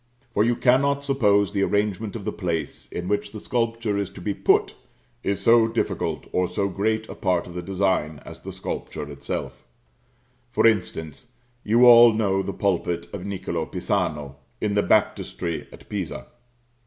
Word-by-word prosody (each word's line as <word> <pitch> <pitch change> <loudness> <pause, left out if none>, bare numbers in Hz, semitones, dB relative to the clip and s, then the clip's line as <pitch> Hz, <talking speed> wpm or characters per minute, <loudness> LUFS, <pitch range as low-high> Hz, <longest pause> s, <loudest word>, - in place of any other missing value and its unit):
For 105 - +3
you 120 +1 +2
cannot 140 +3 +3
suppose 105 -8 +2
the 100 - 0
arrangement 105 +1 0
of 105 -4 -6
the - - -1
place 85 -6 -4
in 90 +1 -4
which 105 +1 -1
the 110 - -6
sculpture 115 -3 -1
is 100 - -2
to - - -12
be 100 +3 -2
put - - +2 0.5
is 100 -1 -1
so 115 +2 +5
difficult 115 +1 -2
or 90 0 +1
so 100 +3 -1
great 110 +3 -1
a - - -7
part 90 -3 0
of 90 - -10
the 90 - -4
design 95 -5 0
as - - -10
the - - -7
sculpture 75 - -5
itself. 70 0 -5 0.9
For - - +2
instance: 90 -8 0 0.3
you 115 +4 +5
all 120 -1 +9
know 100 -3 +1
the 100 - -3
pulpit 90 -4 -1
of 100 -1 -5
Niccolo 90 -4 -3
Pisano, 70 -2 -2 0.2
in 105 -1 -1
the 100 - +3
baptistry 85 -4 0
at - - -14
Pisa. 100 -6 -4
100 Hz, 165 wpm, -24 LUFS, 90-110 Hz, 0.9 s, all